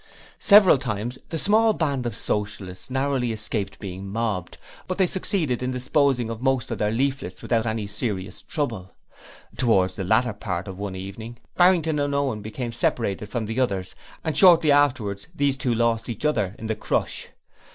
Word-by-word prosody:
Several 200 -8 +7
times 120 0 -4
the 165 - -3
small 220 +5 +4
band 140 -9 -1
of 120 - -4
Socialists 100 -2 -4
narrowly 130 -2 0
escaped 105 -2 -2
being 95 0 -7
mobbed, 105 -3 -3 0.3
but 185 - -3
they 190 - +4
succeeded 175 - 0
in 125 - -1
disposing 130 -1 +1
of 115 0 -6
most 130 -2 0
of - - -3
their 105 - +1
leaflets 130 -5 -2
without 115 -1 +1
any 110 -1 -2
serious 100 -2 -3
trouble. 115 - -4 0.6
Towards 95 -7 +2
the 95 - -3
latter 110 +5 +2
part 95 -3 -4
of 95 -1 -8
one 100 -2 -4
evening 105 +5 -8 0.2
Barrington 170 -4 +4
and 145 0 0
Owen 135 -7 0
became 115 +3 -5
separated 105 -3 -1
from 115 -2 -2
the 115 +4 -3
others, 100 -7 -1 0.3
and 160 - -2
shortly 170 -5 +7
afterwards 130 -9 +2
these 140 -3 +1
two 130 -3 -1
lost 115 0 +1
each 115 +5 -4
other 105 -10 0
in 110 - -8
the 110 - 0
crush. - - -2
120 Hz, 170 wpm, -24 LUFS, 105-140 Hz, 0.6 s, Several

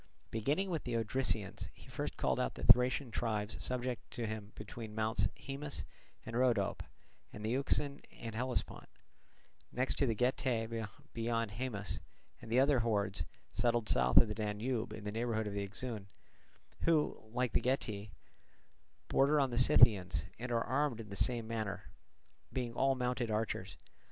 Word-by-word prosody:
Beginning 145 - 0
with 165 -4 -1
the 120 - -2
Odrysians, 115 -3 -1
he - - -16
first - - -4
called - - +1
out - - -1
the - - -8
Thracian 125 +1 +5
tribes 110 -2 -2
subject 125 -3 -2
to 120 - -4
him 110 -1 -5
between 110 -3 -8
Mounts 110 -1 +1
Haemus 140 +1 -5 0.4
and 115 - -5
Rhodope 120 -5 +2 0.5
and 105 - -7
the 110 - 0
Euxine 140 +2 +1
and 115 -1 -7
Hellespont; 125 +3 -2 0.8
next 130 +2 -1
the 125 -6 +2
Getae 115 -2 0 0.2
beyond 115 -1 -1
Haemus, 105 -3 -3 0.4
and 115 - -9
the 120 - +5
other 135 0 +5
hordes 100 -7 0 0.3
settled 120 -1 +1
south 65 0 +3
of 115 - +9
the 105 - -2
Danube 110 +3 -2
in 110 - -7
the 105 - -3
neighbourhood 110 0 -1
of 105 - -3
the 100 - -1
Euxine, 105 +1 -4 0.7
who, 160 -3 +2
like 125 -1 0
the - - +3
Getae, 110 -5 -1 1.0
border 145 +2 +4
on 135 -3 +2
the 120 - -3
Scythians 95 -8 +6
and 125 +1 -4
are 115 -1 +2
armed 135 -2 0
in 110 -2 -7
the 100 - -6
same 110 +3 +1
manner, 110 -3 -4 0.6
being 125 -2 -2
all 135 +2 +3
mounted 125 -2 -1
archers. 110 +1 -2
115 Hz, 155 wpm, -35 LUFS, 105-125 Hz, 1.0 s, of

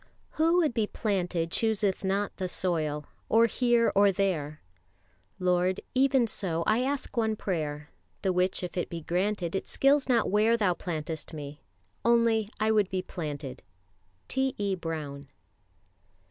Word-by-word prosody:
"Who 330 +3 +2
would 315 -8 +2
be 220 -2 0
planted 180 -7 -1
chooseth 210 -3 +1
not 195 +2 -1
the 185 - -2
soil 155 -5 -1 0.2
Or 230 +1 +5
here 240 0 +2
or 200 0 +5
there,... 170 -7 -1 0.8
Lord 180 +1 +1
even 265 -1 +4
so 175 -6 -2
I 215 +2 +3
ask 275 +2 -2
one 220 -2 +1
prayer, 150 -7 -3 0.3
The 190 -2 +2
which 180 +1 +1
if 180 - -5
it 175 - -1
be 170 -1 -5
granted 180 +1 -1
It 190 - -2
skills 275 0 +3
not 235 -6 +2
where 220 +3 +4
Thou 205 -5 +2
plantest 160 -2 -5
me, 145 -1 -8 0.4
only 230 -2 +3
I 215 +1 +2
would 210 -3 +3
be 185 0 -2
planted." 145 -6 -6 0.7
T. 265 0 0
E. 200 -1 0
BROWN. 155 -5 -5
190 Hz, 145 wpm, -28 LUFS, 165-225 Hz, 0.8 s, Or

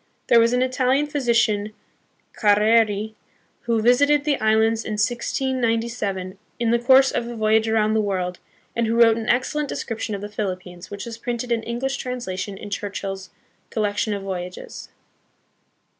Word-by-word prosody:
There 235 - +7
was 230 +1 +4
an 250 +1 +2
Italian 260 +2 +1
physician, 235 -7 +1 0.6
Carreri, 215 0 +3 0.5
who 230 -2 +1
visited 285 +5 +4
the 295 -2 0
islands 220 +1 +2
in 215 - -4
1697, 230 -4 -1 0.2
in 235 -1 +1
the 235 - +3
course 265 +2 +5
of 235 - -2
a 240 - -6
voyage 220 0 +2
around 215 -1 +2
the 220 - +2
world, 185 -3 -2 0.4
and 235 -1 +1
who 225 - 0
wrote 230 -1 +6
an 225 0 -4
excellent 285 +4 0
description 225 -2 -4
of 195 - -6
the 205 - -5
Philippines, 185 -3 -5
which 200 -1 -6
is 230 -1 -8
printed 240 0 -4
in 230 -1 +1
English 240 +4 -3
translation 205 -6 -4
in 205 +1 -9
Churchill's 195 -2 -4 0.4
Collection 210 0 -1
of 200 - -6
Voyages. 180 -2 -6
225 Hz, 155 wpm, -23 LUFS, 205-240 Hz, 0.6 s, There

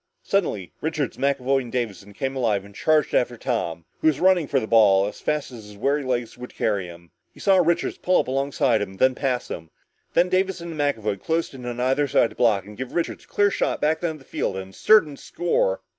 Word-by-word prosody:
Suddenly 110 - -1
Richards, 155 -3 -2
McAvoy 135 0 +1
and 120 -2 -9
Davison 105 -5 -4
came 135 +6 -3
alive 110 -6 0
and 100 - -14
charged 155 +7 +2
after 120 -1 +1
Tom, 85 -10 -3
who - - +1
was 150 -2 +3
running 180 -4 +4
for 135 - +2
the 110 - -3
ball 105 -4 +5
as 105 - -6
fast 150 -3 -1
as 115 -4 -10
his 105 -1 -13
weary 140 +7 +1
legs 120 -2 -3
would 125 - -9
carry 100 -4 0
him. 85 -1 -13 0.2
He - - -18
saw 195 -1 +4
Richards 170 -1 +1
pull 180 0 +3
up - - -1
alongside 135 -3 +1
of 105 - -1
him, 95 - -13
then 130 +4 +4
pass 130 -2 -2
him. 80 -1 -7 0.5
Then 175 +2 +4
Davison 185 -2 -1
and 155 - -8
McAvoy 110 -9 -1
closed 165 -1 -1
in 125 -2 -8
on 120 0 -4
either 135 +3 +1
side 120 - +2
to - - -14
block 105 -5 +2
and 105 +1 -11
give 130 +3 -7
Richards 170 - -2
a - - -31
clear 205 0 +2
shot - - -1
back 155 +1 +1
down 165 -3 -2
the 140 - -17
field 95 - -2
and 95 0 -7
a - - -16
certain 165 -10 +4
score. 95 - -1
130 Hz, 235 wpm, -24 LUFS, 105-155 Hz, 0.5 s, ball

